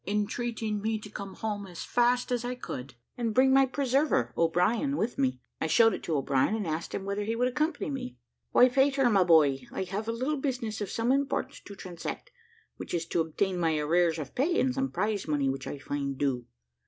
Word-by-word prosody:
entreating 215 +1 -2
me 220 +1 0
to 210 -1 -10
come 200 -2 -7
home 205 -2 -4
as 175 -3 -7
fast 245 +1 +2
as 245 -1 0
I 245 +1 -3
could, 130 - -7 0.2
and 230 -3 -1
bring 265 +1 +5
my 270 0 +5
preserver 265 - +1
O'Brien 215 - +1
with 235 +3 -2
me. 130 -2 +1 0.2
I - - +1
showed 225 +8 +5
it - - -4
to 160 -3 0
O'Brien, 135 +8 +1
and 215 -3 -2
asked 160 +1 -3
him 195 - -4
whether 200 +1 -2
he 225 +2 -1
would 250 +2 +2
accompany 295 +3 -1
me. 125 - -5 0.3
"Why, 250 - +7
Peter, 270 +1 +3
my 195 -3 +5
boy, 150 -6 +4
I - - -2
have 195 +4 -4
a - - 0
little 260 +6 -1
business 245 -6 -3
of 205 - -3
some 230 +2 0
importance 275 0 -1
to 200 - -11
transact; 185 - -7 0.5
which - - -5
is 170 -1 -1
to 170 - +1
obtain 180 +3 -1
my 165 -2 +1
arrears 165 +2 +2
of 145 -5 -6
pay, 325 +7 +1
and 260 -1 +2
some 270 +1 -1
prize 205 +1 -1
money 145 -3 +1
which 135 0 -4
I - - -5
find 140 -1 -3
due. 130 -4 -1
210 Hz, 215 wpm, -29 LUFS, 165-250 Hz, 0.5 s, Why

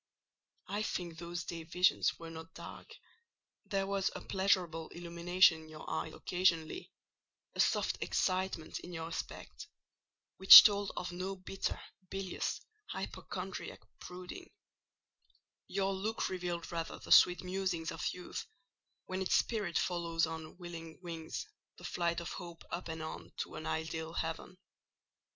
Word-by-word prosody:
I 205 +2 -2
think 175 -6 -3
those 175 0 -4
day 170 -1 -5
visions 180 +3 +2
were 165 -1 -8
not 165 0 -10
dark: - - -10 0.7
there 195 -1 0
was 195 -1 0
a - - -5
pleasurable 180 -4 +1
illumination 170 0 +3
in 160 - -13
your 155 -1 -10
eye - - -1
occasionally, 175 - 0 0.6
a - - -10
soft - - +2
excitement 185 -3 0
in 175 - -9
your 165 -1 -4
aspect, 165 +1 -6 0.7
which 190 - +13
told 205 -2 +3
of 180 - -3
no 185 +2 -3
bitter, 190 +1 -3 0.3
bilious, 195 -1 -3 0.3
hypochondriac - - -5 0.2
brooding: 180 0 -8 1.2
your 195 0 0
look 210 +4 -1
revealed 175 -2 -3
rather 165 -1 -3
the - - -11
sweet 180 +1 +7
musings 180 -2 -1
of - - -3
youth 180 - -6 0.6
when 185 0 -3
its 190 - +2
spirit 210 -7 +1
follows 170 -2 +1
on 160 0 -7
willing 165 -2 -8
wings 165 - -5 0.3
the - - -14
flight 170 -1 0
of 170 - -5
Hope 170 -2 -8
up 175 - -4
and 160 -1 -5
on 160 - -7
to - - -13
an - - -6
ideal 160 0 -3
heaven. 165 +2 -4
175 Hz, 135 wpm, -34 LUFS, 165-185 Hz, 1.2 s, which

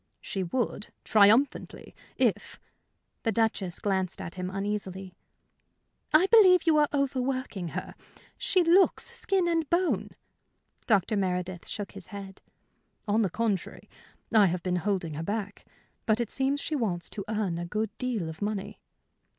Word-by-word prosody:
"She 195 - -4
would 210 +3 -2 0.2
triumphantly 220 +6 +3 0.2
if - - 0 0.3
" - - -49
The 225 - 0
Duchess 215 -5 0
glanced 190 -3 -1
at 170 - -6
him 185 -1 -4
uneasily. 195 -1 -4 1.0
"I 310 +4 +6
believe 385 -4 +6
you 320 -2 +4
are 300 -1 +4
overworking 260 -8 -1
her. - - -5 0.4
She 370 -2 +2
looks 355 +3 +3
skin 380 -3 0
and 330 -3 0
bone." 350 +1 +1 0.8
Dr. 210 -1 +2
Meredith 180 -2 -2
shook 205 -2 -5
his 195 -2 -10
head. 195 -2 -9 0.7
"On 210 +2 +2
the 200 - +1
contrary, 210 -1 -2 0.5
I 210 -3 +6
have 175 0 -2
been 180 -1 0
holding 180 -3 -1
her 150 - -4
back. 205 +1 -4 0.4
But 220 0 +3
it 235 -3 -2
seems 270 +1 0
she 310 - -2
wants 190 -10 -1
to 200 - -4
earn 205 -6 -1
a 175 - -4
good 215 +3 -3
deal 240 -9 -1
of 160 +3 -8
money." 205 -1 -3
210 Hz, 150 wpm, -28 LUFS, 190-260 Hz, 1.0 s, I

